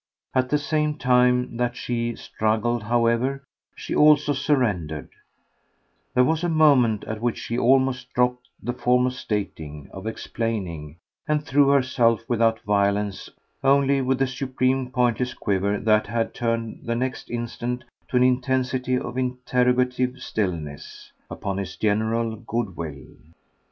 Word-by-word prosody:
At 130 -1 +1
the 150 - +3
same 150 +1 -1
time 125 -2 +2
that 120 0 -1
she 120 -1 -2
struggled, 110 +2 -1
however, 120 +4 +1 0.3
she - - -6
also 150 -1 +5
surrendered; 110 - 0 1.1
there 125 - +6
was 160 +4 +1
a 175 - +1
moment 140 -9 +4
at 110 0 -5
which 120 -1 0
she 115 - -4
almost 130 0 +2
dropped 125 0 +1 0.2
the 120 - -2
form 125 0 +2
of 125 - -1
stating, 80 - -5
of 95 +3 -7
explaining, 95 -10 -4 0.3
and 150 0 0
threw 140 +1 +4
herself, 125 -4 +3
without 115 -2 +2
violence, 100 -1 0 0.3
only 140 0 +4
with 130 0 0
a - - +1
supreme 130 0 -1
pointless 125 0 0
quaver 100 +1 0
that 110 +1 +2
had 115 +2 -1
turned 115 -1 -2
the 115 - -2
next 125 +1 -3
instant 120 +1 -4 0.2
to 125 - 0
an 125 - +5
intensity 130 0 +1
of 125 0 -4
interrogative 125 0 +1
stillness, 85 - -4 0.2
upon 95 -1 -4
his 95 -2 -5
general 110 +2 0
good 115 -4 -3
will. 75 -5 -6
120 Hz, 135 wpm, -24 LUFS, 110-130 Hz, 1.1 s, there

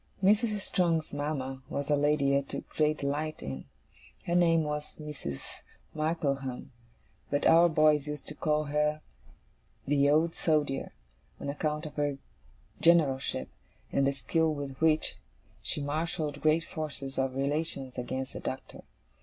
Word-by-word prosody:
Mrs. 210 +1 +3
Strong's 165 -6 0
mama 140 -2 -3
was 140 +1 -2
a - - +6
lady 145 -1 +3
I 140 - +4
took 140 - -6
great 155 0 +1
delight 150 +2 -2
in. 65 -1 -5 0.6
Her 170 - -1
name 165 -2 +4
was 150 0 -4
Mrs. 150 - -6 0.5
Markleham; 140 -5 -2 0.6
but 145 0 0
our 170 +1 +7
boys 155 -2 +4
used 150 -1 -5
to - - -5
call 150 0 +1
her 150 +1 0 0.8
the 140 0 +3
Old 160 +3 +3
Soldier, 150 -4 0 0.5
on - - -4
account 150 +2 -2
of 155 - -8
her 145 -1 0 0.6
generalship, 140 - +3 0.4
and 135 0 +3
the 140 - +2
skill 160 +4 +1
with 140 -2 -4
which 160 -1 +2 0.4
she 145 - -3
marshalled 155 0 -2
great 155 +1 +3
forces 145 -5 -5
of 130 -1 0
relations 140 -2 -1
against 130 +2 -4
the - - -5
Doctor. 130 - -6
150 Hz, 140 wpm, -30 LUFS, 140-155 Hz, 0.8 s, our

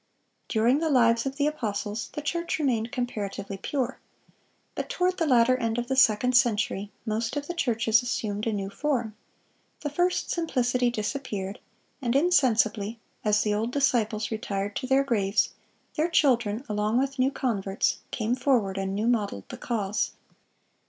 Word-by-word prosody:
(634) 220 - +1
During 245 +6 +4 0.2
the - - +6
lives 230 0 +3
of 270 - -4
the 285 0 +1
apostles 215 -7 -2
the 300 - -5
church 340 +3 -1
remained 240 -6 0
comparatively 205 -6 -4
pure. 265 +4 -2 0.7
But - - -4
"toward 365 -6 0
the 330 - +1
latter 250 -1 +5
end 230 -2 -1
of 240 +1 -3
the 265 - +1
second 250 0 +4
century 210 -4 +2
most 225 +2 -1
of 285 - -3
the 350 - -4
churches 230 -6 +2
assumed 215 -3 -2
a - - +1
new 195 -2 -3
form; 240 -4 -1 0.7
the 295 - -3
first 355 +4 0
simplicity 250 -7 +1
disappeared, 210 -4 -4 0.4
and 240 -1 0
insensibly, 235 - +2 0.3
as 210 -1 +3
the 210 - +1
old 220 +3 -1
disciples 230 -6 +1
retired 205 -2 -3
to 255 - -4
their 270 +1 +4
graves, 210 -6 +1 0.4
their 320 +2 0
children, 245 -7 +2
along 210 +2 0
with 270 +1 -1
new 255 +1 +4
converts,... 200 -8 -1
came 225 0 -1
forward 240 -8 +1
and 195 0 -2
new 210 +2 -1
modeled 210 - 0
the - - -7
cause." 210 -4 -1
235 Hz, 160 wpm, -27 LUFS, 210-270 Hz, 0.7 s, the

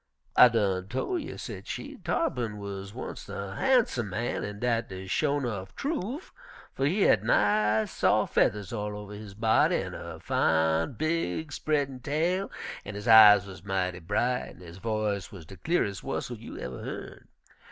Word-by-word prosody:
"I 125 - +10
done 95 -5 0
tol' 130 - -2
you," - - -7
said - - -7
she. - - -6
"Tarr'pin 120 - -1
wuz 100 -1 -6
onct - - -7
a 100 -1 -5
harnsum 210 - +2
man, 110 +6 -2
an' 105 0 -5
dat 115 -1 0
de 95 0 -7
sho' 145 +9 +1
'nuff 110 -8 -4
trufe, 280 - -3 0.4
fer 135 - -1
he 180 +9 +1
had 105 - +4
nice, 105 0 +2
sof' - - +2
fedders 105 -1 +1
all 105 -2 -3
over 105 0 -8
his 105 -1 -9
body 110 +1 +3
an' - - -2
a - - -7
fine, 80 +5 +1
big, 155 - -1
spreadin' 140 -3 -1
tail, 170 +8 0 0.3
an' 100 - -7
his 105 +3 -6
eyes 105 -3 +9
wuz 95 -2 -9
mighty 95 -2 -1
bright 125 +9 -1
an' - - -17
his 85 +1 -11
voice 105 -3 -2
wuz 95 -5 -10
de 95 - -11
cle'res' 100 - -1
whustle - - -4
you - - -9
uver 65 0 -6
yearn. - - -7
105 Hz, 170 wpm, -28 LUFS, 95-135 Hz, 0.4 s, I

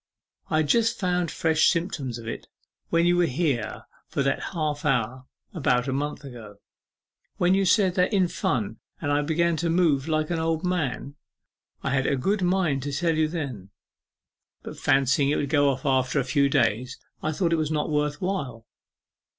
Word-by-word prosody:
I 155 - +1
had 155 -1 +2
just 225 +8 +2
found 180 -3 0
fresh 160 -1 +2
symptoms 155 -8 -2
of 115 -1 -10
it 115 - -6 0.4
when 170 0 +2
you 175 0 +3
were 175 -1 +3
here 130 -6 -1 0.2
for 140 - -1
that 135 - -1
half 150 -3 -2
hour 130 -2 0 0.3
about 125 -7 +1
a 135 - -1
month 145 +2 -3
ago 115 -6 -10 0.8
when 180 +1 +3
you 195 0 +2
said 190 -1 +3
in 185 0 +3
fun 110 -9 -2 0.2
that 145 - -2
I 145 0 +2
began 165 +2 +1
to 170 +2 -1
move 165 -5 +2
like 155 0 0
an 170 - 0
old 160 +1 -1
man. 145 -5 -2 0.7
I - - -1
had 135 0 +1
a 140 - +2
good 195 +10 0
mind 175 -6 +1
to 145 +2 -4
tell 165 +3 0
you 155 0 +2
then, 135 - -5 0.9
but - - -8
fancying 135 0 +2
it 150 - +2
would 140 - -1
go 145 -1 +3
off 130 -1 0
in - - +4
a - - +1
few 140 +2 +2
days, 120 +1 +1 0.2
I 155 - -1
thought 170 +1 0
it - - +2
was 155 -2 -1
not 155 0 -1
worth 150 0 0
while. 140 - -3
150 Hz, 185 wpm, -25 LUFS, 135-170 Hz, 0.9 s, in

